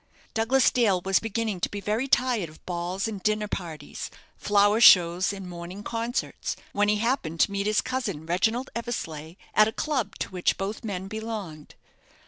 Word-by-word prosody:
Douglas 235 +4 +3
Dale 215 -7 +3
was 190 +1 +2
beginning 225 -3 -2
to - - 0
be 205 - -5
very 215 +6 -1
tired 245 - +2
of 155 - -18
balls 180 +3 -2
and 210 -3 -5
dinner 215 +1 0
parties, 170 -6 -6 0.3
flower 205 +2 +3
shows 180 -2 +7
and 195 -2 -7
morning 175 +3 -8
concerts, 230 +3 -3 0.2
when 205 0 +2
he 210 - +4
happened 210 - -1
to - - +4
meet 200 0 -1
his 215 0 +3
cousin, 255 - -3
Reginald 220 +10 0
Eversleigh, 165 -9 -5 0.2
at 215 - +6
a - - -1
club 255 -5 -2
to - - -4
which 180 -1 +1
both 195 +3 -4
men 195 -3 -4
belonged. 210 -8 -6
205 Hz, 170 wpm, -26 LUFS, 180-225 Hz, 0.3 s, shows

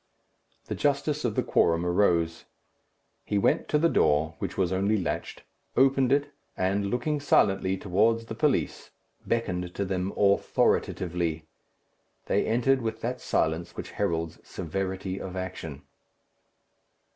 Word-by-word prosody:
The - - -4
justice 145 +1 0
of 120 -4 -1
the - - +1
quorum 85 +1 +2
arose. 85 -3 +1 0.8
He 105 - -1
went 100 - +2
to 150 - +2
the 165 +3 +4
door, 80 - +2
which - - -4
was 95 -2 +1
only 100 +3 +2
latched, 85 -3 -4 0.3
opened 135 0 +4
it, 145 +1 +2 0.3
and, 100 +2 0
looking 145 +6 -1
silently 95 -8 +2
towards 110 +5 +1
the 115 - -6
police, 140 +3 0 0.4
beckoned 90 -6 -2
to 100 - -1
them 95 0 -2
authoritatively. 85 -4 +1 0.8
They - - +1
entered 125 +4 +2
with 110 -1 -3
that 125 +2 -3
silence 80 +1 -1
which - - -6
heralds 80 -1 -2
severity 95 +2 -4
of 95 -1 -6
action. 85 -6 -6
95 Hz, 130 wpm, -27 LUFS, 90-115 Hz, 0.8 s, the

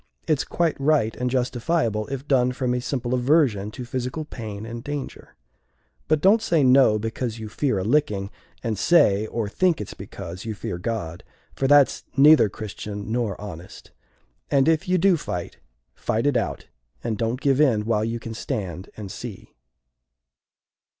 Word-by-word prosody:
It's 155 -4 +2
quite 165 -5 -1
right 140 -6 +2
and 125 0 -1
justifiable, 125 -2 0
if 135 +1 -6
done 125 -2 +3
from 125 -1 -1
a 125 - -1
simple 125 -1 -2
aversion 125 -6 +2
to 125 +3 -7
physical 130 +5 -4
pain 110 -6 -7
and 115 +1 -7
danger. 145 -1 -6 0.7
But 155 -1 +2
don't 205 +5 +5
say 165 -8 +2
'No' 130 -4 +5
because 115 +2 -3
you 110 -1 -6
fear 125 0 0
a 95 - -1
licking 105 -5 +1 0.3
and 110 -4 -2
say 110 - +4
or 115 -2 -2
think 175 - +1
it's 105 - -6
because 95 -2 -8
you 110 -1 -4
fear 90 -3 -5
God, 90 -5 -4 0.3
for 135 - 0
that's 145 -1 +5
neither 145 -5 +7
Christian 105 0 -6
nor 115 -5 -1
honest. 95 -4 -10 0.6
And 140 0 +3
if 165 +3 +2
you 185 - +3
do 185 0 +4
fight, 90 - -5 0.3
fight 115 +3 -1
it 145 -2 +2
out; - - -1 0.4
and 115 -2 -1
don't 115 +3 -1
give 140 0 +2
in 115 -8 +3
while 110 -2 +1
you 115 +1 -2
can 115 0 -7
stand 100 - -4
and 100 -3 -7
see." 115 -3 -9
120 Hz, 165 wpm, -24 LUFS, 105-140 Hz, 0.7 s, neither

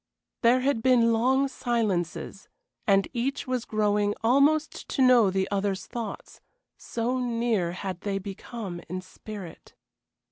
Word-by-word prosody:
There 245 +2 +4
had 265 -3 +1
been 235 -2 +4
long 260 +4 +3
silences, 205 -8 -2 0.4
and 195 -1 +4
each 265 +3 -2
was 255 -3 -2
growing 210 -1 +1
almost 285 +6 +2
to 275 - -1
know 245 -5 +6
the 190 0 0
other's 200 -1 -1
thoughts 230 -4 -7 0.3
so 240 +2 -2
near 230 -7 0
had 185 -1 -5
they 200 -1 -2
become 195 -1 -6
in 185 +1 -4
spirit. 190 -1 -10
225 Hz, 130 wpm, -27 LUFS, 195-250 Hz, 0.4 s, know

